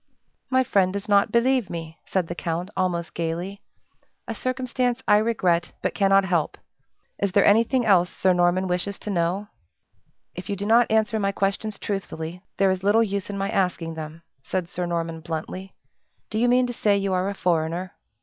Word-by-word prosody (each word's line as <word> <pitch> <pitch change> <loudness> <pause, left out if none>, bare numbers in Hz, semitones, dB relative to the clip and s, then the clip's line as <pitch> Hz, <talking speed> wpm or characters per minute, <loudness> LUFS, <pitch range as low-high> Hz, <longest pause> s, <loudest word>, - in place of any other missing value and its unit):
"My 260 0 +3
friend 195 -6 +2
does 200 +1 -5
not 200 -1 +4
believe 240 -3 +2
me," 165 -1 -7
said 185 -3 0
the 175 - -4
count, 170 +3 -3
almost 175 -2 -1
gayly 170 +4 -3 0.7
"a - - -3
circumstance 255 -1 -1
I 210 - +6
regret, 185 -6 +1
but - - 0
cannot 195 0 +4
help. 175 -4 0 0.6
Is 200 -2 0
there 200 - +5
anything 230 +4 +4
else 180 -4 +4
Sir 185 -1 +2
Norman 175 +1 +2
wishes 180 +2 -1
to 210 - -5
know?" 185 +3 -1 0.8
"If 180 - -8
you 200 - 0
do 200 +1 -4
not 230 +2 +4
answer 220 0 +2
my 200 -1 +1
questions 200 +2 -1
truthfully, 180 -4 -5 0.2
there 195 -1 +4
is 185 -1 -2
little 210 +4 +4
use 200 -2 -3
in 200 - -4
my 195 +1 -2
asking 180 -4 0
them," 160 +1 -8 0.2
said 180 +3 -3
Sir 180 0 -3
Norman, 165 -1 -2
bluntly. 165 +4 -6 0.6
"Do 215 - -1
you 245 - +3
mean 250 +1 +4
to 245 - -4
say 205 -3 +2
you 195 -1 -1
are 185 +1 +1
a 200 - -4
foreigner?" 170 0 -1
195 Hz, 185 wpm, -24 LUFS, 175-210 Hz, 0.8 s, I